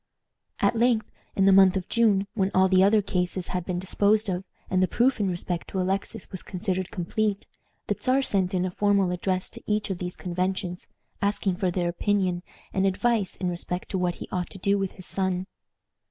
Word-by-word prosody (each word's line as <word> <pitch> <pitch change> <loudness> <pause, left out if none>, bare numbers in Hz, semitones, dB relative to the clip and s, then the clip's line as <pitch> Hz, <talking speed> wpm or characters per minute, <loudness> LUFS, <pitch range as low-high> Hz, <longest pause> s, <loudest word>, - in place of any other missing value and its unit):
At - - +2
length, 230 -1 +2 0.2
in 195 - +3
the 195 - +7
month 190 0 +6
of 185 - -4
June, 215 -4 +3
when 195 -4 +1
all 190 0 +5
the 185 0 +5
other 205 +1 +4
cases 180 -1 -1
had 180 -2 -2
been 180 - -2
disposed 205 +3 +2
of, 180 0 -2 0.2
and 185 0 +1
the 185 - +4
proof 245 +7 +2
in 200 -2 +1
respect 175 -1 -3
to 190 - -3
Alexis 190 +2 -2
was 185 - -4
considered 185 -1 -3
complete, 200 +3 -1 0.4
the - - -1
Czar 265 +1 +2
sent 190 -5 +1
in 180 0 +1
a 185 - -2
formal 200 -1 +2
address 185 +1 -1
to - - -6
each 210 -1 0
of 180 - -3
these 180 -1 -4
conventions, 180 0 -3 0.3
asking 200 -1 +1
their 180 -2 0
opinion 185 -1 0 0.3
and 195 0 +2
advice 210 +1 +1
in 185 - -3
respect 180 +1 -4
to 190 - -1
what 175 -1 0
he - - -8
ought 180 -1 -2
to - - -10
do 200 +2 +2
with 195 -1 -2
his 185 - -8
son. 190 -1 -1
190 Hz, 200 wpm, -26 LUFS, 180-200 Hz, 0.4 s, the